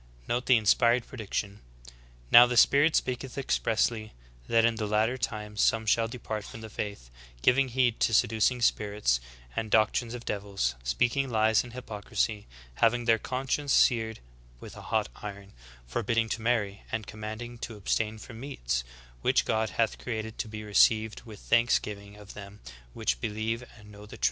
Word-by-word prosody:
Note 120 +1 -1
the 130 - +6
inspired 115 +3 +3
prediction: 105 -3 -5 0.7
"Now 120 +1 +10
the 120 0 -2
Spirit 145 +6 +5
speaketh 125 0 -2
expressly, 115 -4 0 0.3
that 115 0 +4
in 115 -1 +1
the 110 -1 -2
latter 110 +4 +1
times 105 -4 -3
some 110 0 +2
shall 115 +1 +2
depart 110 -3 -5
from 110 - -10
the 110 -1 -9
faith, 100 - -6 0.3
giving 130 +2 +4
heed 125 -2 +1
to - - +2
seducing 115 +3 +2
spirits 105 - +1 0.4
and 110 - -2
doctrines 115 +2 +2
of 120 - -9
devils; 100 -12 -2
speaking 120 - 0
lies 110 -1 +3
in 125 - -10
hypocrisy; 110 -3 -3 0.3
having 120 +1 +2
their 115 -1 +4
conscience 135 +3 -2
seared 110 -2 +3 0.4
with - - -11
a - - -10
hot - - +1
iron; 100 -1 -9 0.3
forbidding 115 - -1
to 110 - -3
marry, 110 -4 0
and 110 -2 -3
commanding 110 +3 -7
to 115 -2 -6
abstain 110 +2 -1
from 115 +1 -11
meats, - - -3 0.4
which - - +2
God 110 0 0
hath 115 -1 -1
created 110 -2 -5
to - - -2
be 105 0 -7
received 110 +1 +3
with 110 -3 -11
thanksgiving 105 -3 0
of 105 0 -12
them 100 0 -11 0.4
v/hich - - -1
believe 110 +2 -2 0.2
and 105 -1 -15
know 105 0 -12
the - - -11
truth." - - -25
110 Hz, 165 wpm, -28 LUFS, 105-120 Hz, 0.7 s, Now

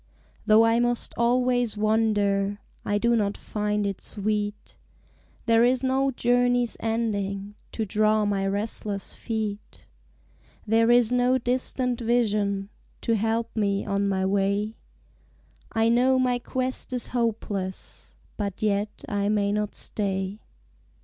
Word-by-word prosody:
Though 220 +1 +6
I 230 +1 +3
must 240 0 -1
always 245 -1 +1
wander 205 -2 +1 0.3
I 205 - 0
do 235 +3 +2
not 205 -2 0
find 210 -1 -2
it 200 -1 -3
sweet: 210 0 -3 0.7
There 230 -1 +4
is 250 +1 +2
no 265 +1 +2
journey's 245 -1 +2
ending 205 -3 -2 0.2
To 220 - -2
draw 215 +1 +2
my 195 -1 0
restless 205 0 -3
feet; 215 -3 -5 0.8
There 225 +1 +3
is 240 -1 +5
no 250 +1 +3
distant 250 0 -1
vision 210 -4 +1 0.3
To 230 - +1
help 225 +2 -1
me 200 -2 0
on 200 0 0
my 190 -1 0
way; 200 +2 0 1.0
I 225 0 +2
know 250 +3 +4
my 250 -1 +1
quest 255 +1 -3
is 250 - 0
hopeless 210 -5 -3 0.2
But 200 -1 -4
yet 210 0 -1
I 205 -1 0
may 205 -1 +1
not 210 0 -2
stay. 195 0 -3
215 Hz, 125 wpm, -25 LUFS, 205-240 Hz, 1.0 s, Though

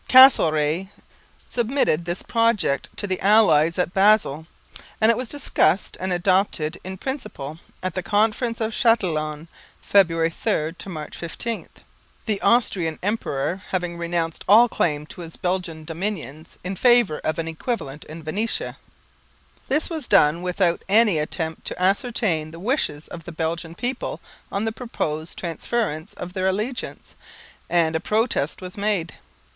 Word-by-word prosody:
Castlereagh 170 - +6 0.6
submitted 235 - +1
this 175 +1 -3
project 230 - +1
to - - 0
the 185 -2 -2
allies 175 -6 +4
at 180 0 0
Basel; 195 -6 +3 0.5
and 220 +1 +6
it - - +1
was 250 +1 -4
discussed 275 -9 +1
and 185 +1 -2
adopted 180 -3 +1
in 190 +1 -6
principle 195 - -5 0.2
at 185 -2 -2
the 185 - -2
Conference 220 +4 +1
of 220 0 -1
Châtillon 165 -10 +1 0.3
(February 165 -4 +3
3 155 -1 -1
to - - -8
March 155 -4 -7
15), 225 +7 -5 0.6
the 210 -3 -1
Austrian 185 -9 +2
Emperor 185 -4 -1
having 175 -2 -2
renounced 170 -1 -2
all 225 +5 +8
claim 150 -9 0
to 175 - -11
his 165 -1 -7
Belgian 180 -3 -3
dominions 160 - -5
in 185 +2 -3
favour 240 -7 +4
of 155 - -2
an 165 -1 -2
equivalent 160 - -4
in 160 +1 -9
Venetia. 220 - -2 0.9
This 300 +4 +1
was 320 -3 -4
done 170 -4 +4
without 180 -1 +1
any 210 -5 +5
attempt 160 +1 -3
to - - -4
ascertain 190 -4 +1
the 165 +1 -11
wishes 185 - -1
of 165 -2 -9
the - - -7
Belgian 165 0 -3
people 245 +5 -3 0.3
on 200 +2 -1
the 225 - 0
proposed 165 -9 -4
transference 170 -1 -3
of 180 0 -7
their 185 -1 0
allegiance, 215 +7 -3 0.6
and 165 -2 +2
a - - +2
protest 210 - 0
was 180 0 -7
made. 200 -5 -1
180 Hz, 145 wpm, -23 LUFS, 160-220 Hz, 0.9 s, all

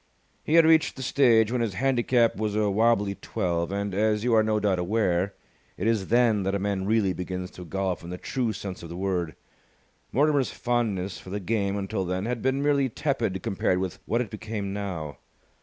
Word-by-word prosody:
He 155 - +1
had 165 -1 +7
reached 160 -1 +4
the 130 - -6
stage 115 -5 +4
when 125 -1 0
his 110 -5 -1
handicap 120 -1 +2
was 105 -1 -2
a 105 -1 +2
wobbly 105 -1 +2
twelve; 90 -4 -2
and, 100 0 -2
as 105 +1 +1
you 120 -1 +2
are 110 - +6
no 110 0 +1
doubt 100 -3 +1
aware, 95 -1 0 0.4
it 95 - -3
is 110 -4 +1
then 115 -3 +3
that 95 +1 -1
a - - +2
man 100 -1 -2
really 105 -3 +2
begins 90 0 -5
to 90 - -10
golf 95 0 -2
in 85 - -8
the 90 - -5
true 120 +3 -2
sense 95 -2 -6
of 85 - -9
the 85 - -7
word. 90 -4 -2 0.8
Mortimer's 145 -1 +2
fondness 100 -7 -1
for 95 - -12
the 100 +2 -3
game 100 0 -1
until 95 0 -2
then 90 +2 -2
had 120 -1 -2
been 130 +2 0
merely 140 -2 +2
tepid 120 -8 -2
compared 95 -4 0
with 95 -1 -3
what 115 +2 +1
it 115 - -5
became 105 -2 -4
now. 90 -8 -5
105 Hz, 205 wpm, -26 LUFS, 95-115 Hz, 0.8 s, had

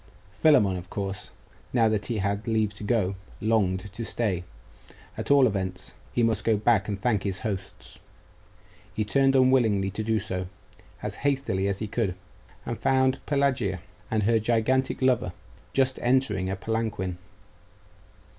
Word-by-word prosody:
Philammon, 105 -8 +4
of 90 +1 -9
course, 100 -1 -4 0.4
now 115 -3 +4
that 110 -2 0
he 115 - -1
had 100 +2 -1
leave 110 -2 +1
to 105 - -10
go, 105 -3 +1 0.3
longed 100 -3 0
to 115 - -5
stay 105 -6 -1 0.7
at - - -5
all 140 -2 +6
events, 95 -5 -2 0.2
he 120 - +1
must 110 -2 +1
go 110 -2 +3
back 110 +2 +2
and 100 -2 -3
thank 105 -2 +1
his 95 -2 -2
hosts. 100 -3 -6 1.0
He 110 - 0
turned 135 +4 +3
unwillingly 120 -7 +3
to 105 - -4
do 110 0 +1
so, 95 -3 -3 0.6
as - - -4
hastily 135 -9 0
as 100 -1 -1
he 110 - -4
could, 100 -4 -1 0.5
and - - -4
found 130 0 +2
Pelagia 130 -9 +1 0.3
and 110 -1 +1
her 115 +2 +3
gigantic 120 +4 +1
lover 120 -8 +2 0.4
just 130 -1 +1
entering 120 -7 +1
a 95 - -1
palanquin. 100 -4 -2
110 Hz, 150 wpm, -26 LUFS, 95-120 Hz, 1.0 s, all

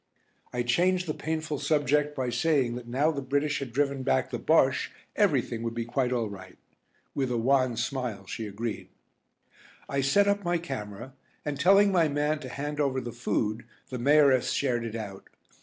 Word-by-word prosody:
I 120 0 -1
changed 180 +9 +2
the 155 - -2
painful 155 -2 -3
subject 150 -1 +1
by 130 -2 -1
saying 140 -5 +1
that 120 0 -7
now 140 +6 +2
the 140 -3 -4
British 145 +2 0
had 135 -3 -5
driven 140 +1 0
back 65 - +1
the - - -3
Bosche - - +3 0.3
everything 115 -1 +1
would 115 0 -3
be 115 -1 -2
quite 125 +1 0
all 120 -3 0
right. 95 -2 -10 0.6
With 135 -2 -1
a 120 - 0
wan 130 0 +2
smile 120 -5 -3
she 110 +3 -5
agreed. 105 +2 -5 1.0
I 140 0 0
set 200 +10 +3
up 200 0 +1
my 175 0 +1
camera, 110 - -6 0.3
and 145 -2 -3
telling 195 +5 +5
my 170 -4 +4
man 150 +1 0
to 130 -3 -8
hand 145 +3 -4
over 135 -3 +1
the 120 -2 -5
food, 110 -2 -1 0.3
the 125 - -4
Mayoress 140 -1 +4
shared 120 -4 0
it 115 -1 -5
out. 100 -4 -7
135 Hz, 180 wpm, -28 LUFS, 120-150 Hz, 1.0 s, telling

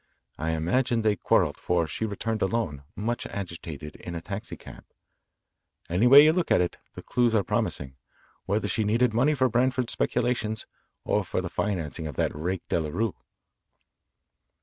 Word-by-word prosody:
I 80 +1 -1
imagine 115 +9 +1
they 105 -1 +3
quarrelled, - - +2
for 85 -2 +1
she 95 +9 -3
returned 110 +1 -3
alone, 95 -9 -1
much 115 +3 -2
agitated, 85 -6 -7
in 85 - -7
a - - -2
taxi 100 +4 -6
cab. - - -12 1.1
Any 95 +8 +3
way 140 +3 +10
you 155 +1 +5
look 180 -1 0
at - - +4
it, 90 -1 0 0.2
the - - -8
clues 120 -2 +2
are 105 - +3
promising 65 -5 -2 0.5
whether 105 +3 0
she 110 - 0
needed 115 +3 +2
money 135 +7 +3
for 130 -2 +3
Branford's 125 +1 +1
speculations 115 -3 -1 0.4
or - - +1
for - - -2
the - - -3
financing 85 -5 -2
of 75 - -7
that - - 0
rake 90 +5 -3
Delarue." 85 +7 -1
105 Hz, 160 wpm, -27 LUFS, 85-120 Hz, 1.1 s, way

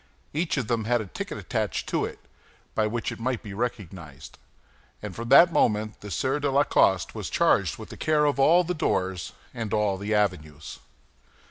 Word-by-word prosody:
Each 160 +1 -1
of 130 - -1
them 115 -2 -1
had 120 +1 +2
a 110 - -4
ticket 95 - -6
attached - - -3
to - - 0
it, - - -7 0.6
by 110 -1 +1
which 115 +2 -3
it - - -8
might 125 0 -2
be 100 -3 -8
recognized; 95 - -6 0.6
and 105 -3 -7
from 115 0 -6
that 165 +5 +7
moment 105 0 +1
the 105 - -8
Sieur 130 - -1
de 145 -1 0
la 140 +1 +4
Coste 95 - +2
was - - -5
charged - - +2
with - - -10
the - - -10
care 150 -1 +2
of 145 -1 +1
all 170 +6 +5
the 180 +1 -2
doors 95 - -1 0.2
and 115 -4 -5
all 105 -2 +1
the 105 +2 -2
avenues. 75 -8 -2
110 Hz, 195 wpm, -26 LUFS, 100-135 Hz, 0.6 s, that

